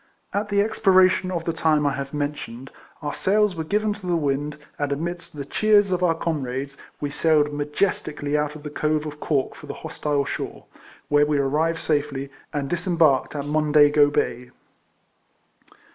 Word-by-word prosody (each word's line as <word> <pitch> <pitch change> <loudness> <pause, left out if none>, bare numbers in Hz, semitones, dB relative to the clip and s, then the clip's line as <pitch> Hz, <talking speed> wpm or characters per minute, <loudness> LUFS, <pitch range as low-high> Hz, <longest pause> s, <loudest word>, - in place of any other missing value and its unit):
At 205 +1 -1
the 200 0 +3
expiration 185 -4 +3
of 170 -3 -2
the 165 - -1
time 155 -2 +2
I 140 - +2
have 140 0 -5
mentioned, 145 -4 -4 0.3
our 145 - -2
sails 210 0 +2
were 160 - -3
given 210 +5 0
to 205 -3 -9
the 175 - +2
wind, 145 -1 -1 0.2
and 145 -1 -1
amidst 170 +2 -4
the 140 - -4
cheers 205 +4 +3
of 180 0 0
our 170 -2 +3
comrades, 140 -4 -3 0.2
we 145 -1 -3
sailed 150 -1 +2
majestically 150 -1 -1
out 150 0 0
of 150 - -10
the 150 - -6
Cove 155 0 0
of 150 0 -7
Cork 140 -4 0
for - - -12
the - - -6
hostile 145 -2 -1
shore, - - -5 0.4
where 145 0 +4
we 150 -1 +1
arrived 155 +4 +1
safely, 145 -3 -1 0.2
and 145 -2 -2
disembarked 165 -5 +2
at 145 -1 -3
Mondego 150 -1 +4
Bay. 125 -3 -1
150 Hz, 170 wpm, -23 LUFS, 145-175 Hz, 0.4 s, where